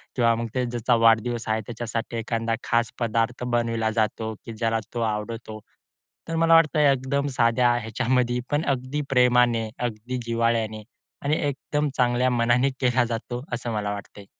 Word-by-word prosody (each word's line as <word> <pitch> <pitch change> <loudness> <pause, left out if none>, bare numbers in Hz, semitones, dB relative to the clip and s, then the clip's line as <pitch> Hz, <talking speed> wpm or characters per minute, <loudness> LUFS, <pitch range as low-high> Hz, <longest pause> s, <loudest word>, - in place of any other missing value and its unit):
किंवा 115 -2 +3
मग 115 0 -3
ते 125 -1 +1
ज्याचा 120 0 +1
वाढदिवस 115 +1 +3
आहे 110 0 +1
त्याच्यासाठी 115 0 -4
एखादा 115 0 -1
खास 115 -1 +1
पदार्थ 115 +2 0
बनवला 115 -2 0
जातो 110 0 -1
की 115 - -7
ज्याला 115 +1 0
तो 120 - -2
आवडतो. 110 0 -3 0.7
तर 165 - -3
मला 165 0 +4
वाटतं 155 -1 +4
एकदम 140 0 +2
साध्या 120 +1 +4
ह्याच्यामध्ये 120 +2 0
पण 145 +2 +1
अगदी 130 +4 -4
प्रेमाने, 125 -3 +3
अगदी 120 +1 -3
जिव्हाळ्याने 115 -2 0 0.4
आणि 150 +2 +1
एकदम 145 +1 -2
चांगल्या 125 0 +2
मनाने 120 +3 +3
केला 125 -1 +2
जातो, 120 +2 -4
असं 120 -1 -3
मला 105 -1 -2
वाटतंय. 100 0 -9
120 Hz, 150 wpm, -24 LUFS, 115-125 Hz, 0.7 s, मला